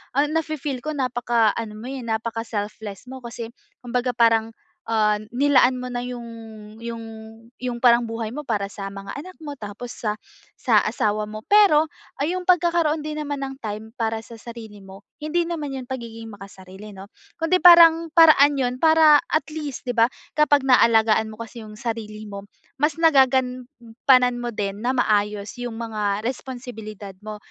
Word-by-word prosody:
ah, 290 +2 +2
nafee-feel 310 -4 -2
ko 310 0 -3
napaka 240 -4 +1
ano 220 -2 -5
mo, 235 +4 -8
eh, 270 - -5
napaka 225 0 -3
selfless 205 -2 -5
mo 260 0 -8
kasi 235 -1 -7 0.3
kumbaga 250 +1 -1
parang, 225 -1 +3 0.4
ah, 215 -2 +2 0.2
nilaan 260 -1 +4
mo 250 - -5
na 245 - -2
'yung 245 -1 -6 0.6
'yung 230 -1 -6 0.6
'yung 250 -1 -3
parang 240 -1 +6
buhay 225 -1 -4
mo 300 - -5
para 210 -5 -1
sa 200 -1 -7
mga 195 0 -8
anak 370 +6 -9
mo 295 -2 -6
tapos 220 +2 -8
sa, 210 -2 -3 0.4
sa - - +3
asawa 210 0 0
mo. 215 +1 -9
Pero 400 -8 +5 0.4
ay, 305 +5 0
'yung 365 0 -4
pagkakaroon 340 -3 +3
din 305 0 -4
naman 285 -1 -4
ng 270 0 -7
time 220 +1 -6
para 225 -2 -1
sa 230 - -12
sarili 225 -4 -10
mo 195 +1 -14 0.2
hindi 330 +3 0
naman 325 -4 -4
'yun 260 -1 -6
pagiging 230 -3 -7
makasarili 195 +1 -12
'no? 195 +1 -11 0.3
Kundi 335 +3 +1
parang 335 -1 +8
paraan 300 -4 +6
'yun 255 -1 -2
para 315 -2 +6
at 310 - -1
least 295 -5 -6
'di 245 - -2
ba? 230 0 +4 0.2
Kapag 290 -2 +3
naalagaan 225 -3 +4
mo 215 - -11
kasi 230 +1 -9
'yung 215 -1 -11
sarili 215 -2 -5
mo 200 -1 -8 0.4
mas 305 +2 +1
nagagampanan 255 -4 +2
mo 240 - -3
din 205 -2 -4
na 255 +2 -1
maayos 210 -2 0
'yong 240 -2 -5
mga 215 -2 -2
responsibilidad 230 -6 -7
mo. 215 0 -7
240 Hz, 170 wpm, -23 LUFS, 215-285 Hz, 0.6 s, parang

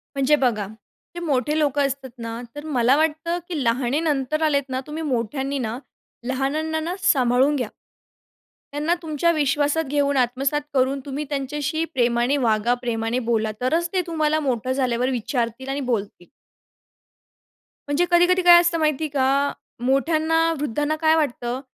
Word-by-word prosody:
म्हणजे 275 +2 +3
बघा, 235 -8 0 0.5
जे - - -4
मोठे 290 0 0
लोकं 285 -1 +2
असतात 270 -1 -6
ना 230 0 -6
तर 290 +1 -7
मला 255 -3 +3
वाटतं, 320 +2 0
की 320 -6 -3
लहानेनंतर 270 +4 0
आलेत 285 -2 +2
ना 260 0 -2
तुम्ही 315 +2 -5
मोठ्यांनी 270 +1 -2
ना, 230 0 -3 0.5
लहानांना 300 +5 -1
ना, 335 +3 -3
सांभाळून 270 -5 +3
घ्या. 250 -5 -1 1.0
त्यांना 300 +4 0
तुमच्या 320 +1 +1
विश्वासात 295 +1 +1
घेऊन, 285 0 +1
आत्मसात 265 +4 +1
करून 265 +1 +1
तुम्ही 285 +1 -4
त्यांच्याशी 295 +3 -2
प्रेमाने 240 +2 +2
वागा, 230 -2 +2
प्रेमाने 230 0 -1
बोला 220 -2 +1
तरच 325 +7 +1
ते 370 - +2
तुम्हाला 310 -2 +1
मोठं 255 -4 -1
झाल्यावर 255 -1 0
विचारतील 245 +1 -2
आणि 275 +1 -2
बोलतील. 200 -5 -3 1.6
म्हणजे 290 +5 +2
कधी-कधी 355 +1 +4
काय 350 -1 +8
असतं 345 -1 +1
माहिती 310 0 +1
का? 280 0 +1 0.3
मोठ्यांना 320 +4 +2
वृद्धांना 295 +3 -1
काय 315 0 +4
वाटतं, 250 -4 -1
280 Hz, 140 wpm, -23 LUFS, 250-310 Hz, 1.6 s, काय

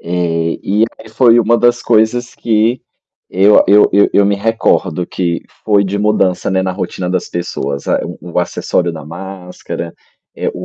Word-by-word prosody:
Eh, 85 -1 -2
e 105 +3 +2
aí, 110 - -13
foi 115 +1 +4
uma 115 +1 +3
das 120 0 +2
coisas 120 +2 +1
que 115 +2 0 0.5
eu 100 +3 +5
a - - +3
eu 105 +1 +6
eu 100 0 +4
eu 100 - +4
me 100 - +2
recordo, 100 -5 0
que 85 -2 -2 0.2
foi 100 -2 +3
de 100 +1 -2
mudança, 100 -4 +1
né, 95 0 +1
na 95 0 -2
rotina 90 -1 -4
das 90 -1 -2
pessoas: 70 -5 -4
a - - +1 0.2
o 85 +1 -4
acessório 90 0 -1
da 80 -3 -9
máscara, 90 0 -8 0.4
eh, - - -2
o - - -7
95 Hz, 175 wpm, -15 LUFS, 90-110 Hz, 0.5 s, eu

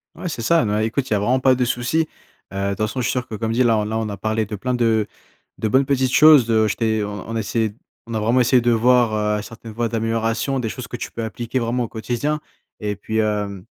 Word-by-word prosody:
Ouais, 180 +1 -5
c'est 115 -6 -5
ça, 165 +3 +3
bah, 105 0 0
écoute, 130 +4 -1
il - - +1
y - - +3
a 100 - +1
vraiment 125 +6 +2
pas 130 0 +4
de 125 - +1
souci. 125 +7 0 0.5
Heu, 95 - -5
de 100 0 0
toute 100 - -3
façon, 110 +5 -2
je 120 - -1
suis - - +1
sûr 125 -1 -2
que - - -10
comme 110 +1 -2
dit 120 +3 +2
là 110 -3 +3
là, 110 +1 -2
on 110 -1 -2
a 100 - -4
parlé 110 0 -1
de 105 - -5
plein 125 +5 -2
de 115 -3 +2 0.5
de 110 - -1
bonnes 130 +5 +3
petites 130 -2 +1
choses 150 -4 +7
de 110 -1 +2
je 105 - -1
t'ai 110 -2 0
on 105 -1 -6
on 115 - -4
a - - 0
essayé 110 -1 -1 0.3
on 115 - -7
a 110 - 0
vraiment 115 +4 +2
essayé 125 +1 +4
de 120 - +1
voir, 120 0 +3 0.3
heu, - - -4
certaines 115 0 -10
voies 115 +1 -2
d'amélioration, 115 +4 -1
des 115 -3 -2
choses 125 +1 -7
que 120 - -6
tu - - -6
peux 115 - -5
appliquer 115 +3 -4
vraiment 120 +1 0
au - - -3
quotidien. 120 +8 -2 0.4
Et 105 -1 -2
puis, 110 +2 -4
hem, 105 -3 -1
de - - -21
115 Hz, 280 wpm, -21 LUFS, 110-125 Hz, 0.5 s, choses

